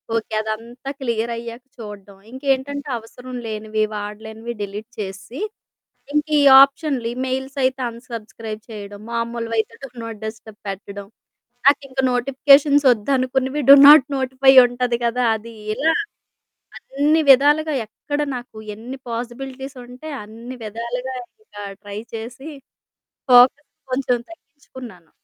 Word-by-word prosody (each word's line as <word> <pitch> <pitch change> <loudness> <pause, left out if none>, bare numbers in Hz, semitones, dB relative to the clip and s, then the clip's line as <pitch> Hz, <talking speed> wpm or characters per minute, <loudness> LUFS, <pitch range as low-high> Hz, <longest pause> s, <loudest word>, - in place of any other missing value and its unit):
Okay 220 -1 -2
అదంతా 230 +5 -6
clear 235 -2 -1
అయ్యాక 235 +1 -8
చూడ్డం. 205 -3 -10
ఇంకేంటంటే 275 +2 -2
అవసరం 250 +3 -11
లేనివి, 215 0 -2
వాడలేనివి 220 +3 -6
డిలీట్ 205 +3 -6
చేసి. 205 - -7 0.7
ఇంకా 300 +1 0
ఈ - - +4 0.2
ఆప్షన్లు 275 -3 0
ఈమెయిల్స్ 265 +2 -3
అయితే 260 +1 0
అన్సబ్స్క్రైబ్ 225 -2 -8
చేయడం. 205 -1 -8
మామూలువి 230 0 -3
అయితే 220 - -1
డు - - -7
నాట్ 225 -2 -7
డిస్టర్బ్ 220 -1 -8
పెట్టడం. 200 +1 -7 0.6
నాకింక 275 -2 +2
నోటిఫికేషన్స్ 275 +3 +4
వద్దనుకున్నవి 260 +4 0
డు 280 - +13
నాట్ 295 -2 +9
నోటిఫై 265 +1 +3
ఉంటుంది 245 -1 -1
కదా! 245 +1 0
అది. 230 +2 -9 0.2
ఇలా 320 +6 +2 0.8
అన్ని 295 +4 +1
విధాలుగా 295 +3 +5
ఎక్కడ 290 +7 -4
నాకు 245 -3 -9 0.2
ఎన్ని 240 +5 -8
పాసిబిలిటీస్ 260 +3 -6
ఉంటే, 250 +5 -11 0.2
అన్ని 230 +4 -10
విధాలుగా 235 +4 -5 0.3
ఇంకా, 205 - -11 0.2
ట్రై 205 0 -6
చేసి, 235 +6 -7 0.8
ఫోకస్ 255 +4 +6 0.2
కొంచెం 255 -2 +1
తగ్గించుకున్నాను. 255 - -13
245 Hz, 115 wpm, -21 LUFS, 220-270 Hz, 0.8 s, డు